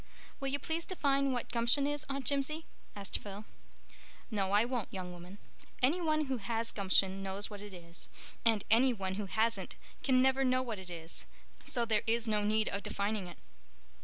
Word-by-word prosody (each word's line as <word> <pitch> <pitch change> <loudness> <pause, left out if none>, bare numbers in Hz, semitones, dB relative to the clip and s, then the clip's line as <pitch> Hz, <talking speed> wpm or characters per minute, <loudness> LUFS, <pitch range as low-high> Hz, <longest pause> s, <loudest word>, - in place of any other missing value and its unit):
"Will 275 - -2
you 275 +1 +1
please 320 +4 -2
define 275 -7 +1
what 245 -2 -1
gumption 240 +4 +3
is, 290 -1 -1
Aunt 275 -1 -3
Jimsie?" 290 +3 +1 0.3
asked 200 -2 -1
Phil. 205 +1 -8 0.9
"No, 195 -3 0
I 205 +3 +5
won't, 245 -3 -2
young 185 -2 -5
woman. 175 +3 -10 0.4
Any 295 +8 +3
one 310 -2 +2
who 265 -2 -1
has 230 +1 -1
gumption 195 -1 +2
knows 195 +2 -1
what 205 -1 -7
it 205 0 -8
is, 170 -2 -7 0.3
and 225 -3 +3
any 250 +3 +6
one 190 -4 -3
who 200 +1 -3
hasn't 225 +3 +1 0.3
can 260 -2 +4
never 265 +1 +4
know 255 0 +3
what 225 -5 -4
it 185 -1 -9
is. 165 -1 -4 0.4
So 240 -5 +1
there 220 -2 +2
is 230 +1 +2
no 210 -1 +2
need 215 +1 +2
of 200 - -1
defining 200 -1 -1
it." 175 - -10
225 Hz, 190 wpm, -33 LUFS, 200-265 Hz, 0.9 s, any